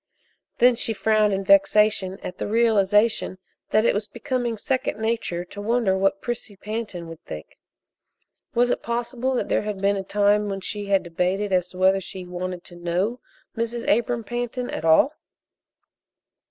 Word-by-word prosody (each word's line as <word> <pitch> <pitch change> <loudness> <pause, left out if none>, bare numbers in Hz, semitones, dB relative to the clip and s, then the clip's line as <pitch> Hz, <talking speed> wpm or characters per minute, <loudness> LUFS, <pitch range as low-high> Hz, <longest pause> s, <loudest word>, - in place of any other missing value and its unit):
Then 250 +1 +6
she 225 - -2
frowned 215 +1 +2
in 195 0 -1
vexation 195 0 +4
at 180 - -7
the - - -2
realization 215 -2 +2 0.3
that 215 +1 +3
it - - +4
was 210 +1 -2
becoming 245 -1 -2
second 260 -1 -1
nature 220 -6 -2
to 205 +3 -9
wonder 225 -2 +1
what 195 +1 +1
Prissy 235 -4 -4
Pantin 205 -4 -5
would 165 0 -10
think. 75 0 -9 1.0
Was 245 +1 +3
it - - -1
possible 240 +2 -2
that - - -1
there - - +1
had 210 -2 -4
been 200 +1 +2
a 195 - -3
time 205 +1 +2
when 195 -1 -3
she 205 +1 -5
had 195 -2 +3
debated 185 +4 -1
as 180 -1 +2
to 180 - -13
whether 190 +1 +4
she 185 0 -7
wanted 180 0 -5
to 175 - -13
know 180 +8 -1 0.4
Mrs. 230 +1 -3
Abram 235 +2 +1
Pantin 245 +1 -3
at - - -4
all? 165 - +5
205 Hz, 165 wpm, -24 LUFS, 190-230 Hz, 1.0 s, Then